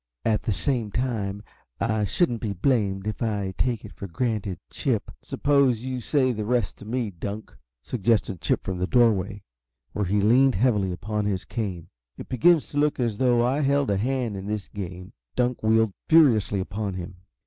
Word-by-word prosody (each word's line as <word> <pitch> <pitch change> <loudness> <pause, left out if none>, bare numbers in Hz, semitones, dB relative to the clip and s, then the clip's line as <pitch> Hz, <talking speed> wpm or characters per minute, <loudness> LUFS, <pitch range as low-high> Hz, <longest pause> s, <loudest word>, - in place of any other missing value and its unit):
At 110 -1 +2
the 115 - -1
same 105 +6 0
time 105 -5 -2 0.4
I 110 -2 +1
shouldn't 120 - 0
be 105 -3 -2
blamed 100 -2 0
if 105 -1 -4
I 100 -4 -1
take 120 -4 -1
it - - -10
for 100 - -7
granted 100 0 -2
Chip - - -1
" - - -56
"Suppose 140 -5 +2
you 130 0 -4
say 130 +1 +2
the 110 -3 -3
rest 120 -2 -1
to - - -11
me, 115 -1 -2
Dunk," 100 +5 -6 0.3
suggested 100 - 0
Chip - - 0
from 95 -2 -4
the 90 - 0
doorway, 105 -4 +2 0.5
where 105 - -1
he 100 +3 +1
leaned 125 +6 +4
heavily 105 -4 +2
upon 105 +5 -3
his 100 -2 -1
cane. 95 -7 -4 0.3
"It - - -9
begins 155 +6 +4
to 145 - -2
look 150 -1 +1
as 115 -4 -1
though 120 -2 +3
I 130 +4 +1
held 140 -3 +2
a 100 - +2
hand 120 0 -1
in 95 0 -6
this 105 -2 -3
game." 90 0 -7 0.2
Dunk 125 0 0
wheeled 110 -1 +3 0.2
furiously 120 -11 +5
upon 100 +1 -4
him. 90 0 -7
110 Hz, 185 wpm, -25 LUFS, 100-125 Hz, 0.5 s, furiously